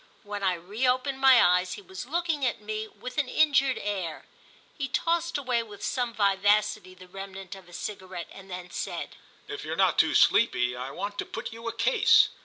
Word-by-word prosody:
When 205 -1 -5
I 185 -2 +2
reopened 250 +9 -1
my 265 -2 +7
eyes 180 +1 +3
he 205 - -8
was 190 +5 -8
looking 325 -1 -1
at 245 -5 0
me 215 +1 -4
with 250 +5 -6
an 280 - 0
injured 275 -4 +3
air. 190 -6 -4 0.5
He 275 -3 -3
tossed 335 +5 0
away 250 -4 0
with 210 -3 -11
some 245 -3 -1
vivacity 205 -2 +2
the 185 0 -14
remnant 195 0 -8
of 190 -2 -13
a - - -16
cigarette 185 -1 -6
and 195 0 -12
then 180 -1 -7
said: - - -5 0.3
"If 415 0 -6
you're - - -3
not - - +3
too - - +4
sleepy 125 - +4
I 125 +2 -5
want 205 +8 -5
to - - 0
put - - -6
you 230 +1 -8
a 230 - -2
case." 230 +3 +5
210 Hz, 195 wpm, -27 LUFS, 185-255 Hz, 0.5 s, my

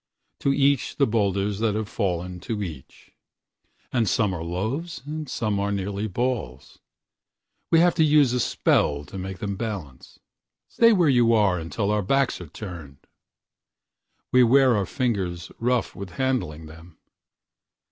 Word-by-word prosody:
To 140 - +1
each 140 -1 +2
the 140 - +3
boulders 100 -3 0
that 110 -2 +1
have 110 -1 -2
fallen 90 -4 -3
to 105 +4 -4
each. 75 -8 -10 0.8
And 115 -5 +2
some 105 -4 +1
are 85 -2 -4
loaves 110 - -4
and 155 -1 -5
some 105 -5 -1
so 100 0 -1
nearly 100 +1 -3
ballsWe 105 - -3 1.0
have 170 +2 +5
to 160 - +3
use 145 -4 +4
a 125 - +1
spell 75 -9 +1
to 95 - -8
make 95 0 -5
them 100 +1 -4
balance:"Stay 105 - -2
where 180 -7 +3
you 120 -4 +4
are 100 -5 +3
until 100 +6 -2
our 105 0 +1
backs 135 +2 +1
are 90 - -8
turned!"We 85 - -7
wear 130 +1 +5
our 100 -3 0
fingers 95 -8 -2
rough 125 +1 0
with 95 -3 -8
handling 105 -12 -2
them. 80 +2 -14
105 Hz, 140 wpm, -24 LUFS, 90-125 Hz, 1.0 s, have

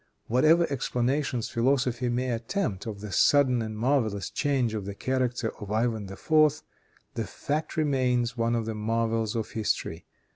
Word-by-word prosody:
Whatever 155 +8 +4
explanations 130 -1 -1
philosophy 125 0 +1
may 125 +1 -1
attempt 115 - -2
of 105 -3 -6
the 105 -1 -6
sudden 130 +1 +4
and 110 -1 -5
marvelous 110 -5 0
change 135 -6 0
of 105 -3 -3
the 100 0 -5
character 125 -1 -1
of 105 -1 -6
Ivan 110 -3 -1
IV., 155 +6 +2 0.5
the 115 -5 -3
fact 150 - -3
remains 125 -5 +1
one 115 0 +1
of 115 -1 -1
the 110 - -3
marvels 115 0 -1
of 110 -2 -3
history. 110 -2 -2
120 Hz, 150 wpm, -27 LUFS, 110-135 Hz, 0.5 s, Whatever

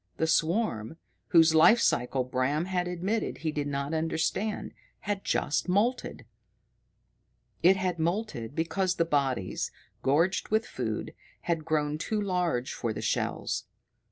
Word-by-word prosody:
The 160 - +1
swarm, 165 - 0 0.3
whose 165 -1 +6
life 165 +9 +7
cycle 125 - +1
Bram 130 +5 0
had 180 -1 -1
admitted 185 +5 -2
he 155 - +1
did 145 -1 -2
not 140 +1 -2
understand, 165 +6 -1 0.3
had 200 -1 -3
just 155 - 0
moulted! 225 +7 0 1.4
It 190 +3 +6
had 180 -3 -1
moulted 165 - -2
because 180 +3 0
the 165 - +2
bodies, 135 - 0 0.3
gorged 165 +7 +2
with 220 +2 +2
food, - - -4 0.3
had 165 -3 -1
grown 150 -1 0
too 215 +5 -1
large 180 -10 -1
for 115 - -2
the - - -5
shells. - - -1
165 Hz, 130 wpm, -29 LUFS, 145-190 Hz, 1.4 s, life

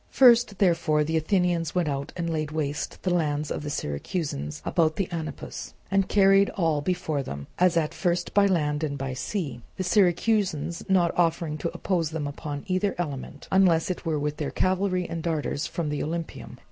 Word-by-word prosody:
First 240 -5 +5
therefore 165 -5 +3
the 160 +2 -2
Athenians 170 0 +1
went 175 -3 +2
out 140 -1 -3
and 170 -1 -2
laid 155 -2 -1
waste 150 -2 -3
the 180 - +1
lands 150 -3 0
of - - -2
the 145 - -4
Syracusans 75 - -3
about 160 -2 +2
the 195 0 -1
Anapus 160 -4 -6 0.2
and 195 -1 +2
carried 195 0 +5
all 160 -5 +2
before 155 -3 -1
them 70 - -6
as 180 -1 +4
at 155 -2 +1
first 175 0 -1
by 200 -1 +5
land 150 -5 0
and 145 -2 -2
by 135 -1 -3
sea, 135 - -3 0.2
the 185 - -1
Syracusans 180 -3 +2
not 180 -3 +3
offering 165 -2 +1
to 170 - -1
oppose 170 -5 -1
them 160 -2 -3
upon 145 0 -5
either 185 +2 0
element, 145 -3 -5
unless 185 -3 +4
it 180 - -5
were 160 -3 0
with 150 0 -2
their 150 - -2
cavalry 185 -1 0
and 165 0 -4
darters 155 -3 -1
from 165 -3 -3
the 150 -1 -2
Olympieum. 165 +2 -5
165 Hz, 185 wpm, -26 LUFS, 150-180 Hz, 0.2 s, First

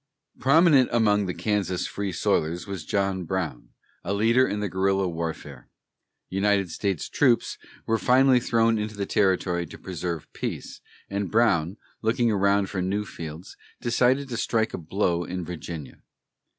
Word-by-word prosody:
Prominent 140 0 +5
among 105 -4 +2
the 90 - -2
Kansas 100 -4 -1
Free 100 -1 -3
Soilers 85 0 0
was 95 -6 -6
John 95 -2 0
Brown, 85 -7 -4 0.3
a 100 - -1
leader 115 +5 +4
in 105 - -2
the 105 - -1
guerrilla 95 +1 +1
warfare. 80 -6 -6 0.6
United 100 -1 +1
States 100 -3 -2
troops 125 -5 +2 0.3
were 115 0 +1
finally 130 0 +5
thrown 115 -2 +2
into 105 0 -4
the 100 - -1
territory 95 -3 +1
to - - -11
preserve 85 -3 -4
peace, - - -5 0.3
and 100 -1 -3
Brown, 100 -5 +2 0.2
looking 115 +1 +2
around 100 -1 +2
for 95 -2 -3
new 100 +3 -1
fields, 80 -2 -8 0.2
decided 125 +3 +2
to 120 - -3
strike 110 -2 0
a - - -4
blow 85 +1 0
in 90 0 -5
Virginia. 85 -3 -7
100 Hz, 150 wpm, -25 LUFS, 90-115 Hz, 0.6 s, Prominent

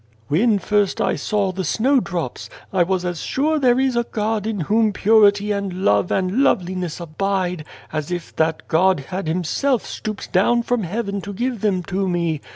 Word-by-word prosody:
" 110 0 -34
When 205 +8 +3
first 205 0 0
I - - +1
saw 205 -3 0
the 190 +1 -4
snowdrops, 180 - 0 0.2
I 185 - +2
was 180 +1 +1
as 175 -2 -3
sure 305 +3 0
there 250 -2 +3
is 265 -2 +1
a 235 - +3
God 215 -1 -2
in 215 -4 -2
Whom 215 +5 +2
purity 205 0 +4
and 200 -1 -2
love 100 -1 +3
and 190 +7 +1
loveliness 180 - 0
abide, 180 0 -2 0.3
as 155 -2 -3
if 175 -2 -5
that 160 0 0
God 180 0 +3
had 185 -2 -3
Him 175 +3 0
self 260 - 0
stooped 215 -2 -6
down 235 +6 +3
from 245 -1 0
heaven 200 +2 -3
to 200 +2 -7
give 240 +1 -2
them 190 -4 +1
to 190 +1 -2
me. 170 -4 -1
195 Hz, 185 wpm, -21 LUFS, 175-220 Hz, 0.3 s, purity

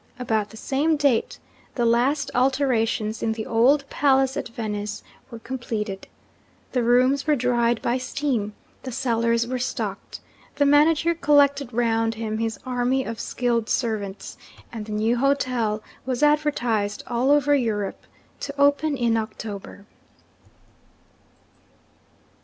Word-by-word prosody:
About 220 -4 -1
the 220 - -12
same 295 +6 0
date, 280 -6 +1 0.4
the 240 - +1
last 250 +5 +2
alterations 245 -4 +1
in 225 - 0
the 220 -1 -5
old 270 +5 +3
palace 270 -1 +2
at - - -3
Venice 210 -2 -4 0.3
were 230 - -8
completed. 225 -5 -5 0.6
The 250 - +1
rooms 255 +5 +3
were 300 - +4
dried 240 -2 +1
by 245 +2 0
steam; 255 -5 -2 0.3
the 260 - -6
cellars 235 -2 +1
were 255 +1 -3
stocked; 255 - -4 0.4
the 285 0 +2
manager 305 +3 +4
collected 285 -4 +3
round 225 -1 +1
him 220 -1 -3
his 225 -2 -2
army 255 +1 0
of 230 -3 -6
skilled 235 -2 -1
servants; 210 -5 -3 0.3
and 220 -2 -6
the - - -7
new 220 +3 +1
hotel 250 -5 0 0.2
was 255 +2 -2
advertised 245 -9 +1
all 245 +2 0
over 290 0 +4
Europe 220 -7 -1 0.3
to 280 0 -6
open 285 +1 +3
in 235 -2 +1
October. 215 -2 -6
240 Hz, 130 wpm, -24 LUFS, 225-275 Hz, 0.6 s, were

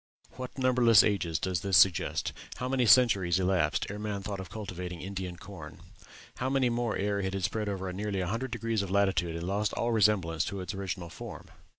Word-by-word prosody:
What 130 +1 -8
numberless 125 -5 +5
ages 90 -6 0
does 90 -1 -2
this 95 -1 +3
suggest? 95 -2 +3 0.2
How 125 - -4
many 130 -2 +1
centuries 100 -8 +5
elapsed 90 -4 +1
ere 105 +1 -6
man 105 -2 -4
thought 100 -1 -4
of 95 - -7
cultivating 90 -4 -6
Indian 95 -1 -5
corn? 85 -5 -10 0.6
How 130 - -1
many 135 -2 +2
more 120 -1 -1
ere 100 0 0
it 95 0 -2
had 95 - -3
spread 105 +3 -1
over 95 -2 -4
nearly 100 0 -3
a - - -1
hundred 115 +8 -2
degrees 115 -2 -1
of 100 - -4
latitude 95 -4 +1
and 85 +1 -4
lost 100 +2 -1
all 120 - -1
resemblance 95 -7 +2
to 100 +1 -4
its 90 -2 -5
original 90 -3 -5
form?' - - -9
100 Hz, 200 wpm, -29 LUFS, 90-110 Hz, 0.6 s, numberless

